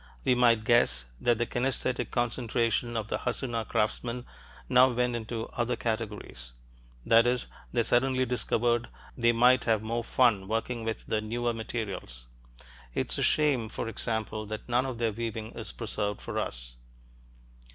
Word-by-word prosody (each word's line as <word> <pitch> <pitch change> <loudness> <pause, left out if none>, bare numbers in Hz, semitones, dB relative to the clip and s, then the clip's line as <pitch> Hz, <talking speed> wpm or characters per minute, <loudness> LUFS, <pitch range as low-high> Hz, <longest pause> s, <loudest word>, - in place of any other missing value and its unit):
We - - +5
might 120 -3 +4
guess 110 - +3
that 120 -2 +2
the 120 - +1
kinaesthetic 125 0 -1
concentration 120 -1 0
of 110 -2 -2
the - - -1
Hassuna 115 -4 -2
craftsmen 120 +3 -1 0.4
now 130 0 +6
went 125 0 0
into 115 0 -4
other 120 0 -1
categories; 105 - -4 0.5
that 115 +1 +6
is, 125 0 +1 0.3
they 120 -1 +2
suddenly 130 +2 +2
discovered 120 -1 +1 0.3
they 120 -1 +4
might 125 +2 +5
have 110 -2 +2
more 115 +2 -2
fun 115 -6 +3
working 115 +2 -2
with 110 -1 -3
the 110 - 0
newer 120 +2 -1
materials. 105 - -5 0.7
It's - - -1
a - - 0
shame, 140 -7 +2
for 115 - -4
example, 110 -1 -3
that 110 +1 -6
none 125 +2 +2
of 130 -3 -4
their 115 -1 +1
weaving 110 0 -4
is 115 - -5
preserved 105 -3 -3
for - - -3
us. - - -5
115 Hz, 150 wpm, -29 LUFS, 110-120 Hz, 0.7 s, now